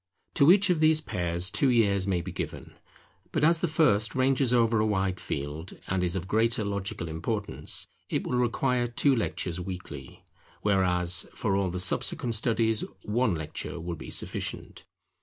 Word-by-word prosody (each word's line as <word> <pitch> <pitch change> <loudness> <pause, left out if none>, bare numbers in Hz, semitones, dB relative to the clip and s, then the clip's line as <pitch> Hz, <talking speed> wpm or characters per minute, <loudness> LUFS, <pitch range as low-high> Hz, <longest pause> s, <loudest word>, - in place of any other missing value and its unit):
To 140 +4 +6
each 195 0 +5
of 170 - +1
these 155 0 +4
pairs, 90 - -3
two 140 - +2
years 100 -5 +2
may 90 -3 +1
be - - -6
given. - - -6 0.6
But - - -1
as 165 +1 +4
the 175 - +1
first 150 -10 +2
ranges 130 -1 +2
over 115 -2 +3
a 110 - +2
wide 95 -3 0
field, 75 +5 -5
and 95 -1 0
is 90 0 -1
of 95 -1 -4
greater 110 +1 +1
logical 100 -3 -3
importance, 100 +7 -3 0.2
it - - -1
will 125 - 0
require 125 0 +1
two 130 +3 +2
lectures 90 -6 -2
weekly; 90 -7 -8 0.4
whereas, 90 -3 +2
for 100 -3 0
all 100 -1 +1
the 90 - -4
subsequent 125 - +1
studies 110 0 +1 0.2
one 110 -2 +1
lecture 80 +2 -5
will 85 +1 -4
be - - -9
sufficient. - - -3
105 Hz, 165 wpm, -28 LUFS, 90-125 Hz, 0.6 s, To